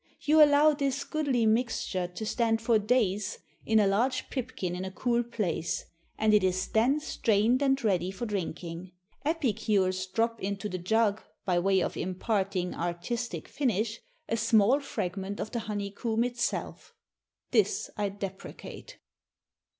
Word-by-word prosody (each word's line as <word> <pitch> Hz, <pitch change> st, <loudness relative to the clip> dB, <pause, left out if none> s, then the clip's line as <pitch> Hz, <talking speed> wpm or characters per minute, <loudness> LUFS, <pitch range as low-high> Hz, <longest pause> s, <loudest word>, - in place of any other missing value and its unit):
You 305 Hz, +1 st, +6 dB
allow 295 Hz, +1 st, +6 dB
this 280 Hz, -1 st, -1 dB
goodly 280 Hz, -7 st, 0 dB
mixture 220 Hz, -5 st, 0 dB
to 180 Hz, +5 st, -6 dB
stand 225 Hz, 0 st, +1 dB
for 225 Hz, -1 st, +3 dB
days 210 Hz, -3 st, +1 dB, 0.3 s
in 220 Hz, 0 st, +4 dB
a 210 Hz, -, +4 dB
large 220 Hz, +7 st, +1 dB
pipkin 230 Hz, -9 st, -3 dB
in 180 Hz, -, -4 dB
a 190 Hz, -, -3 dB
cool 235 Hz, +4 st, 0 dB
place, 210 Hz, -8 st, -2 dB, 0.3 s
and 215 Hz, 0 st, +3 dB
it 210 Hz, -2 st, +5 dB
is 185 Hz, 0 st, +1 dB
then 250 Hz, +7 st, +3 dB
strained 230 Hz, -3 st, +2 dB
and 270 Hz, -1 st, +2 dB
ready 185 Hz, -4 st, +1 dB
for 195 Hz, +5 st, -5 dB
drinking. 180 Hz, -3 st, -5 dB, 0.3 s
Epicures 205 Hz, -, +1 dB
drop 225 Hz, +4 st, -1 dB
into 200 Hz, +1 st, -3 dB
the 185 Hz, -3 st, -4 dB
jug, 215 Hz, +3 st, +2 dB, 0.2 s
by 180 Hz, -3 st, +2 dB
way 190 Hz, +1 st, +3 dB
of -, -, -3 dB
imparting 190 Hz, -1 st, -1 dB
artistic 175 Hz, +8 st, -3 dB
finish, 225 Hz, -4 st, -1 dB, 0.3 s
a 230 Hz, -, 0 dB
small 225 Hz, +3 st, +4 dB
fragment 195 Hz, -7 st, -4 dB
of 215 Hz, -, -4 dB
the 235 Hz, -, -2 dB
honeycomb 215 Hz, +2 st, -2 dB
itself. 245 Hz, -1 st, -3 dB, 0.6 s
This -, -, +2 dB
I 205 Hz, -1 st, -1 dB
deprecate." 200 Hz, -, -8 dB
215 Hz, 140 wpm, -29 LUFS, 190-240 Hz, 0.6 s, You